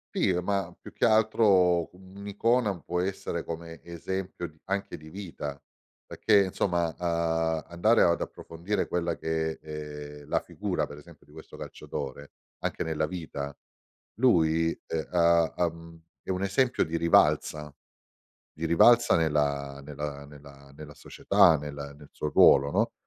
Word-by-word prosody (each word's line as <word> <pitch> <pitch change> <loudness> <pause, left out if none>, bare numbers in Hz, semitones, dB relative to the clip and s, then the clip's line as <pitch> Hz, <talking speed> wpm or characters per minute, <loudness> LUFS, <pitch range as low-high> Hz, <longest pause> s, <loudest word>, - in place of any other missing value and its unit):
Sì, 95 - +2
ma 100 0 -1
più - - -12
che - - +1
altro, 100 -6 +4
un'icona 100 +2 -1
può 90 0 -2
essere 95 +1 -3
come 85 0 -7
esempio 90 +1 -5
di 80 -1 -20
anche 100 -2 -3
di 80 -1 -12
vita, 80 -7 -7 0.5
perché 105 -2 +3
insomma, 90 -2 0
uhm, 80 -2 0
andare 105 +7 +3
ad 85 -1 +2
approfondire 85 +6 -4
quella 85 -1 -1
che 80 0 -2
è 75 -1 -8
la - - 0
figura, 90 -7 -3
per 75 0 -11
esempio, 75 0 -17
di 75 - -22
questo 80 0 -12
calciatore, 70 0 -7 0.3
anche - - -3
nella 80 -1 -1
vita, 75 -5 -6 0.6
lui, 80 -9 +3 0.2
ehm, 80 -1 -3
ha 85 -1 +4
ha 90 - +2
mhmm, 85 0 -13 0.2
è - - -13
un 95 +1 -1
esempio 120 +6 +2
di 80 +1 -4
rivalsa, 75 -3 +2 0.8
di 80 +2 -3
rivalsa 120 +9 +6
nella 70 -3 0
nella 70 0 -6
nella 70 -1 -15
nella 75 -1 -10
società, 80 - +3
nella 70 -1 -7
nel 75 -1 -15
suo 75 - -4
ruolo, 70 0 +6
no, - - +1
80 Hz, 145 wpm, -28 LUFS, 75-95 Hz, 0.8 s, rivalsa